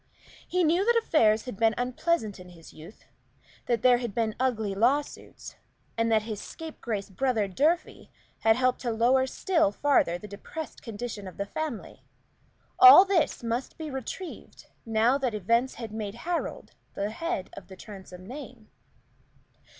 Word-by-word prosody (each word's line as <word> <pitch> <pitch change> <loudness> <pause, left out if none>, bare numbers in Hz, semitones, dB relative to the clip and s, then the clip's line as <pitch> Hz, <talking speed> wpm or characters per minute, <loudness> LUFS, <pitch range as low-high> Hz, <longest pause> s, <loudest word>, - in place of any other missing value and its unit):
He 365 0 +1
knew 340 +4 +3
that 475 +3 +3
affairs 225 - +3
had 250 -6 -7
been 225 +1 +3
unpleasant 245 - -1
in 180 0 -12
his 165 -2 -15
youth 160 +7 -14 0.6
that 235 -3 0
there 245 -1 +5
had 235 -5 -5
been 225 -2 0
ugly 220 -6 0
lawsuits 260 +9 -1 0.4
and 230 0 0
that 220 -1 +3
his 215 -2 -5
scapegrace 230 - -6
brother 225 0 0
Durfey 305 - -1 0.3
had 225 0 +4
helped 255 0 +1
to 245 - -2
lower 245 +4 +2
still 325 - +1
farther 205 -8 +2
the 210 - -10
depressed 255 +10 -8
condition 220 -3 -6
of 185 - -11
the 200 - -2
family. 300 +2 -6 0.8
All 380 0 +10
this 380 -9 0
must 235 +3 -3
be 315 -3 -6
retrieved, 265 +7 -7 0.2
now 225 +5 +2
that 255 -5 -1
events 230 +6 +1
had 230 -3 -7
made 215 -1 -5
Harold 345 -1 -3 0.2
the 200 +1 -2
head 225 - -4
of - - -11
the 190 - -11
Transome 185 -2 -11
name. 250 -2 -10
235 Hz, 155 wpm, -27 LUFS, 210-280 Hz, 0.8 s, All